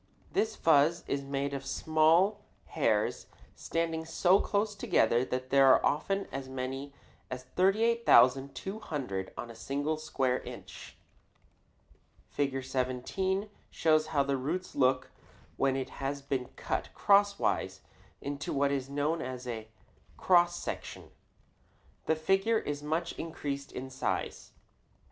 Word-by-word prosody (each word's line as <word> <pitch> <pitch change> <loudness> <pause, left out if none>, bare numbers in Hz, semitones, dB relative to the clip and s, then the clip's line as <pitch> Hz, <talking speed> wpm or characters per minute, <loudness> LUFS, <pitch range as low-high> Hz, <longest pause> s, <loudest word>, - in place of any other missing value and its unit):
This 220 0 +1
fuzz 160 +2 +3
is 140 - -1
made 140 0 -3
of 135 -1 -4
small 160 +8 +3 0.3
hairs - - 0 0.3
standing 165 -1 -2
so 175 +4 +3
close 205 +1 0
together 120 - +2
that 130 0 -4
there 135 0 +6
are 130 - +6
often 195 +7 0
as 135 -1 -5
many 130 +2 -4 0.4
as 130 0 -5
38,200 180 - +2
on 120 - -6
a - - -12
single 145 +6 -2
square 130 -5 0
inch. - - -10 1.3
Fig. 135 -2 -1
17 130 +10 -1 0.2
shows 155 -1 +2
how 145 -3 +2
a 140 - +1
root 160 +8 -3
looks 130 -1 +2 0.5
when 135 -1 +1
it 130 -1 -3
has 140 +1 -3
been 135 -2 -2
cut - - -3
crosswise 200 0 +2 0.4
into 140 0 -4
what 140 0 +1
is 135 -1 -2
known 145 +4 -1
as 125 0 -6
a 110 -3 -5 0.5
cross 175 -1 +4
section. - - -6 1.0
The 160 - +3
figure 195 +8 +2
is 145 -8 -3
much 160 +3 -1
increased 140 -4 -5
in 130 +1 -7
size. 130 - -3
140 Hz, 125 wpm, -30 LUFS, 130-170 Hz, 1.3 s, there